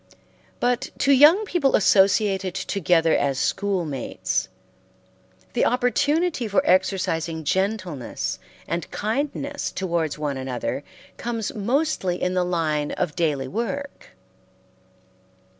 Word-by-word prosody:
But 245 +1 0
to 280 - +2
young 300 +10 +7
people 335 -9 +2
associated 195 -1 +3
together 165 -4 +2
as 140 -2 0
schoolmates, 175 -8 -1 1.0
the - - +1
opportunity 285 +3 +1
for 205 - +2
exercising 165 -3 +1
gentleness 175 - -2 0.3
and 170 -1 -3
kindness 280 +5 -2
towards 170 -5 -2
one 145 -2 -2
another 130 +1 -3 0.3
comes 230 -3 -3
mostly 220 - 0
in 180 - 0
the 180 -1 +2
line 155 -4 -1
of 150 - -2
daily 150 -6 0
work. 280 - -5
190 Hz, 100 wpm, -23 LUFS, 160-245 Hz, 1.0 s, young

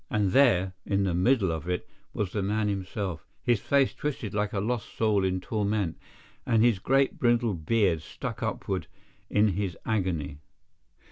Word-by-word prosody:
And 105 -7 +1
there, 95 -9 +4
in 100 0 +1
the 95 -3 0
middle 95 +1 +3
of 80 +1 -4
it, 90 - -2 0.2
was 100 -4 -2
the 105 - -1
man 105 +2 0
himself—his 100 +3 -2
face 140 -2 +2
twisted 125 -8 -4
like 105 0 0
a 100 - -1
lost 115 +2 -3
soul 105 -3 +2
in 95 0 0
torment, 100 -4 -1 0.5
and 115 -1 +3
his 120 -5 +3
great 135 +6 +2
brindled 115 -9 +1
beard 100 -8 +3
stuck - - -6
upward - - -2 0.4
in 105 +1 +3
his 95 -1 -2
agony. 85 -10 -1
105 Hz, 155 wpm, -28 LUFS, 95-115 Hz, 0.5 s, there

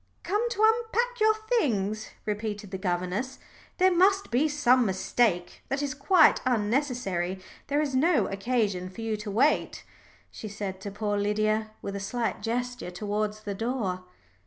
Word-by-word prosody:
"Come 420 +6 0
to 435 -2 -1
unpack 470 +2 +1
your 435 0 +4 0.2
things," 215 - -1 0.2
repeated 210 -1 -4
the 190 - -4
governess. 185 +7 -2 0.4
"There 370 0 +4
must 385 +1 +3
be 260 +6 +3
some 260 -4 +3
mistake 190 -2 0
that 275 +1 -1
is 280 -2 -2
quite 315 +4 +5
unnecessary. 220 -6 0 0.3
There 285 +2 +1
is 280 -3 -3
no 305 +5 +3
occasion 195 -3 -1
for 190 +5 -9
you 225 -1 -1
to 210 0 -6
wait," 245 +10 +1 0.5
she 215 - -8
said 195 -2 -5
to 200 - -5
poor 205 0 -1
Lydia, 215 +1 +1
with 200 - -4
a - - -3
slight 230 +3 -2
gesture 245 -1 -3
towards 210 +3 -3
the 205 -1 -4
door. 205 -4 -2
220 Hz, 155 wpm, -27 LUFS, 200-280 Hz, 0.5 s, quite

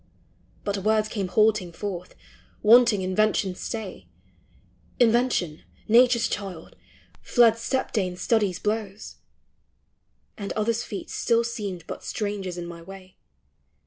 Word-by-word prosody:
But 200 -1 -2
words 215 +2 +2
came 200 -4 -3
halting 210 -2 +2
forth, 180 -2 -6 0.5
wanting 225 -2 +6
Invention's 190 0 +1
stay; 220 -5 -6 0.9
Invention, 235 -9 +2 0.3
Nature's 240 +1 +5
child, 190 -5 -6 0.5
fled 235 -3 +4
step 260 +3 -1
dame 185 -5 -1
Stud 220 +4 +1 0.2
blows; 210 -1 -3 1.2
And 200 -1 -4
others' 225 +2 0
feet 205 -4 -7
still 235 -1 +2
seemed 205 -7 -5
but - - -7
strangers 200 -4 -4
in 175 - -5
my 170 -1 -9
way. 190 +1 -12
210 Hz, 110 wpm, -25 LUFS, 185-225 Hz, 1.2 s, wanting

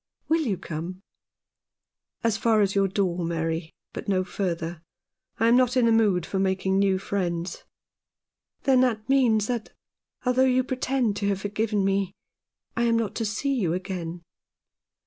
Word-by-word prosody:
Will 325 +1 +2
you 220 - -1
come? 170 +4 -6 0.6
" - - -51
"As 230 -2 +2
far 225 -1 +3
as 195 -1 +2
your 195 -1 +3
door, 185 -3 -1
Mary, 165 0 -2 0.2
but - - -6
no 190 -2 +2
further. 170 -3 -3 0.6
I 225 - +4
am 235 - +6
not 255 0 +3
in 245 - +4
the 230 - +4
mood 205 -6 +3
for 195 - -2
making 190 0 +1
new 195 -1 +3
friends." 180 -3 -3 0.5
" - - -53
Then 260 -2 +4
that 225 -4 0
means 240 -6 +3
that, 235 -1 -3 0.5
although 250 +1 +3
you 255 0 +3
pretend 255 -4 0
to 200 - -1
have 195 -1 0
forgiven 205 0 0
me, 195 -1 0 0.6
I 235 - +1
am 230 -1 +3
not 220 -3 -1
to 225 - -1
see 220 +7 -1
you 190 -11 0
again." 175 -2 -5
200 Hz, 165 wpm, -26 LUFS, 185-230 Hz, 0.6 s, am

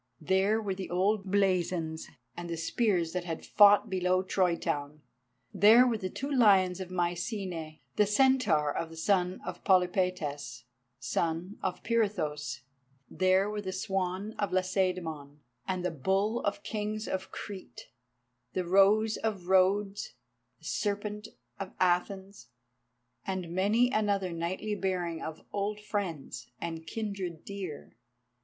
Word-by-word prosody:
There 190 +6 +2
were 205 -3 -2
the 190 0 -6
old 195 +3 +1
blazons, 180 -5 0 0.3
and 175 0 -6
the 165 - -3
spears 175 -1 +1
that 180 -1 -2
had 165 -2 -5
fought 205 0 +6
below 185 0 +1
Troy 185 -2 +2
town. 145 -1 -4 0.5
There 225 +5 +7
were 235 -3 0
the 185 - -3
two 275 +9 -5
lions 195 -8 +4
of 185 -1 -6
Mycenæ, 175 -2 -3 0.2
the 210 -1 +4
Centaur 210 - +3
of 165 - -2
the 165 - -11
son 180 +1 +1
of - - -6
Polypaetas, 180 - +1 0.4
son 165 - -2
of 190 - -3
Pirithous; 150 - -1 0.5
there 185 +1 +3
were 210 0 -3
the 190 -2 -4
Swan 190 +1 -2
of 205 - 0
Lacedæmon, 180 -6 -1 0.3
and 185 -1 -2
the 180 - 0
Bull 195 - 0
of 205 0 +1
the 200 - -20
Kings 215 0 -3
of 190 0 -3
Crete, 185 - -8 0.6
the 185 - -1
Rose 200 +4 +4
of 195 -5 -3
Rhodes, 195 +2 +2 0.4
the 160 - -19
Serpent 205 - -2 0.3
of 195 -1 -6
Athens, 190 +2 0 0.8
and 185 -3 -4
many 215 +7 +3
another 200 -4 +1
knightly 175 +5 -3
bearing 180 -5 -2
of 160 0 -7
old 205 +1 -2
friends 170 - -4
and 165 -1 -5
kindred 195 -7 -4
dear. 190 -7 -7
185 Hz, 135 wpm, -30 LUFS, 170-205 Hz, 0.8 s, There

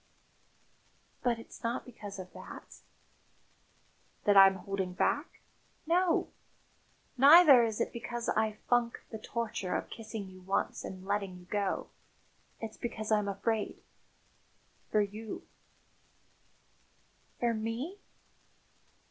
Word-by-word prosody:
"But 240 -2 +1
it's 230 - -12
not 230 +1 -2
because 210 -5 -9
of 185 -1 -9
that - - -11 0.7
?" - - -37
"That 205 - +5
I'm 195 -1 +9
holding 190 -1 -3
back? 290 - -1 0.4
No. 345 +1 +2 0.9
Neither 285 -1 +9
is 220 -2 -1
it - - -1
because 240 0 -4
I 220 0 +1
funk 240 -1 +1
the 220 - -5
torture 220 -4 -3
of - - -3
kissing 220 -3 -6
you 185 0 -13
once 195 +2 -1
and 185 0 -7
letting 195 -2 -2
you 180 - -14
go. 200 +1 -1 0.7
It's 225 -1 -6
because 220 -2 -4
I'm 210 -1 +3
afraid 210 +2 -2 1.1
for 215 - +4
you." 210 +1 -5 1.9
"For 240 -1 +2
me?" 230 - -4
220 Hz, 115 wpm, -31 LUFS, 195-235 Hz, 1.9 s, I'm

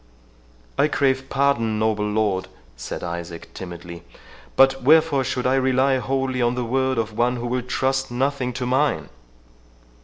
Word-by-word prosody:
"I - - +5
crave 135 -3 0
pardon, 135 -6 +1
noble 105 -1 0
lord," 105 -3 0 0.3
said 60 - -6
Isaac 85 -1 -6
timidly, 85 -2 -8 0.5
"but 135 0 +4
wherefore 155 0 +4
should 125 -1 -2
I 130 - +3
rely 130 0 +2
wholly 130 0 -1
on 120 +1 +2
the 125 -1 -2
word 130 +2 0
of 110 -1 -2
one 120 +2 +1
who 120 0 -5
will 125 +1 -1
trust 135 +2 -1
nothing 130 +1 -1
to 125 +1 -3
mine?" 135 +4 +1
125 Hz, 150 wpm, -22 LUFS, 110-135 Hz, 0.5 s, I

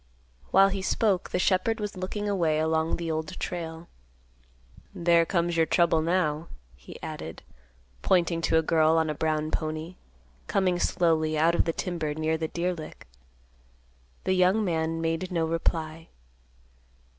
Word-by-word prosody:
While 195 +1 +6
he 195 0 -3
spoke, 190 -1 +1
the - - -1
shepherd 190 +5 +1
was 210 -1 -4
looking 190 +3 -4
away 170 -6 +1
along 160 +1 +1
the 170 -1 -3
Old 160 +3 -4
Trail. 165 -1 -5 1.1
"There 170 -1 +3
comes 170 -2 0
your 165 -1 +3
trouble 170 -2 +3
now," 165 -2 0 0.3
he 65 - -12
added, 80 +1 -7 0.6
pointing 170 -2 +2
to 160 - +4
a 160 - +3
girl 160 0 +3
on 160 -1 +1
a - - -2
brown 155 0 -1
pony, 155 +3 -4 0.5
coming 185 -2 +1
slowly 160 -4 +1
out 165 +2 +3
of - - +2
the 165 - +1
timber 160 -3 -3
near 160 +1 0
the 160 0 -2
deer 175 +3 -1
lick. 160 -3 -10 1.2
The 185 - +1
young 185 +4 +3
man 165 -2 -1
made 165 +3 -2
no 165 -2 +1
reply. 160 0 -2
165 Hz, 150 wpm, -27 LUFS, 160-180 Hz, 1.2 s, While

